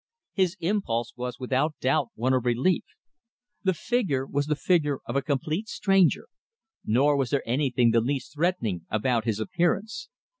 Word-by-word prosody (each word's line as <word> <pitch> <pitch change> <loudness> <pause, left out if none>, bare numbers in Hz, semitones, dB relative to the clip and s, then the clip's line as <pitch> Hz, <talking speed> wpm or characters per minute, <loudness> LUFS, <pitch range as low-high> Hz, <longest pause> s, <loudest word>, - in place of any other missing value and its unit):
His 190 -1 +1
impulse 165 - -1
was, 125 0 -5
without 135 +4 0
doubt, 135 +1 +1
one 130 +4 +1
of 130 -2 +1
relief. 125 +9 +1 0.8
The 190 -2 +2
figure 165 - 0
was 145 +1 -1
the 150 - +1
figure 150 -4 +1
of 120 - -5
a 140 - +2
complete 155 +8 -2
stranger. 195 - +2 0.6
Nor 140 +7 +3
was 135 -3 0
there 140 -2 -1
anything 125 -2 +2
the 115 0 +3
least 130 +2 -3
threatening 145 - -1
about 110 +1 0
his 110 -3 -1
appearance. 175 - -1
140 Hz, 155 wpm, -26 LUFS, 120-170 Hz, 0.8 s, Nor